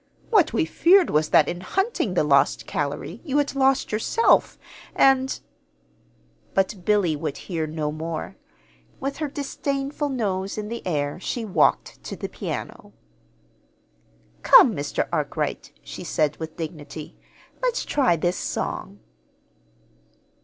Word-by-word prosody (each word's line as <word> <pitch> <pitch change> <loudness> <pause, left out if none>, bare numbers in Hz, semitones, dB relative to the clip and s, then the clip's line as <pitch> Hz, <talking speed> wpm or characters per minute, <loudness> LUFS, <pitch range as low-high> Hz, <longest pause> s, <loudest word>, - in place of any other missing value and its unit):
What 390 -8 +4
we 220 - +1
feared 355 - +4
was, 155 0 +2
that, 150 - +5
in 175 - -4
hunting 380 - -1
the - - +3
lost 140 -2 +3
calory, 145 +9 -4
you 290 -4 -1
had 290 -1 +1
lost 270 0 +2
yourself, 225 - +2 0.4
and 265 -1 +3 0.5
" - - -36
But 195 -1 0
Billy 195 -5 +2
would 150 -1 -4
hear 165 -4 -3
no 155 -1 -3
more. 160 +4 -5 0.6
With 275 +1 -3
her 310 - -2
disdainful 280 +1 -3
nose 200 -7 -2
in 210 0 -4
the 235 0 -5
air 145 -2 -1
she 230 +4 -3
walked 200 - +1
to - - -5
the - - -5
piano. - - -6 1.5
"Come, - - +7
Mr. - - -2
Arkwright," - - -2
she - - -8
said 150 -1 0
with 160 -1 -7
dignity. 155 -2 -7 0.5
"Let's - - 0
try 260 -12 +2
this 175 +3 -1
song." - - -4
195 Hz, 130 wpm, -24 LUFS, -, 1.5 s, Come